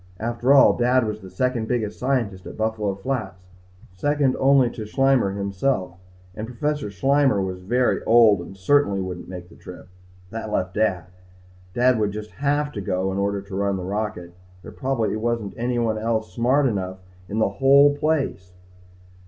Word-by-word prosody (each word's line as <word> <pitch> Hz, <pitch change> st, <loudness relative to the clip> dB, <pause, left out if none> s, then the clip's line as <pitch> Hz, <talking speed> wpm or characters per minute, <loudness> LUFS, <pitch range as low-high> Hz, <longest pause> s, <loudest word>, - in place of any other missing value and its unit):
After 120 Hz, +3 st, 0 dB
all, 140 Hz, -1 st, +7 dB
Dad 125 Hz, 0 st, +2 dB
was 105 Hz, 0 st, -4 dB
the 95 Hz, -, -10 dB
second 120 Hz, +4 st, -1 dB
biggest 110 Hz, -4 st, -2 dB
scientist 115 Hz, -8 st, -1 dB
at -, -, -9 dB
Buffalo 110 Hz, -2 st, -1 dB
Flats. 95 Hz, -5 st, -4 dB, 0.5 s
Second 145 Hz, +6 st, +1 dB
only 135 Hz, -2 st, +4 dB
to 110 Hz, -3 st, -7 dB
Schleimmer 130 Hz, -5 st, +2 dB
himself 100 Hz, -1 st, -2 dB, 0.3 s
and 110 Hz, +4 st, -6 dB
Professor 145 Hz, 0 st, -2 dB
Schleimmer 135 Hz, +3 st, +2 dB
was 95 Hz, -1 st, -3 dB
very 120 Hz, +7 st, +1 dB
old 110 Hz, -5 st, +5 dB
and 95 Hz, +3 st, -10 dB
certainly 100 Hz, 0 st, +2 dB
wouldn't 90 Hz, -2 st, -6 dB
make 90 Hz, -1 st, -8 dB
the -, -, -16 dB
trip. -, -, -12 dB, 0.4 s
That 110 Hz, -1 st, -5 dB
left 95 Hz, -2 st, -1 dB
Dad. 95 Hz, -5 st, 0 dB, 0.7 s
Dad 125 Hz, -1 st, +3 dB
would 105 Hz, -2 st, 0 dB
just 105 Hz, 0 st, -7 dB
have 145 Hz, +1 st, +1 dB
to 105 Hz, -, -5 dB
go 95 Hz, 0 st, -1 dB
in 95 Hz, -, -2 dB
order 100 Hz, 0 st, -1 dB
to 100 Hz, -1 st, -9 dB
run 100 Hz, 0 st, 0 dB
the 90 Hz, -, -5 dB
rocket. 95 Hz, -3 st, -4 dB, 0.3 s
There -, -, -9 dB
probably 130 Hz, -6 st, -1 dB
wasn't 115 Hz, -2 st, -2 dB
anybody 115 Hz, -2 st, -1 dB
else 110 Hz, -3 st, -2 dB
smart 130 Hz, +7 st, +2 dB
enough 95 Hz, -6 st, -2 dB, 0.3 s
in 105 Hz, -, -3 dB
the 110 Hz, -, +2 dB
whole 140 Hz, +2 st, +6 dB
place. 145 Hz, -12 st, -1 dB
110 Hz, 170 wpm, -23 LUFS, 95-130 Hz, 0.7 s, all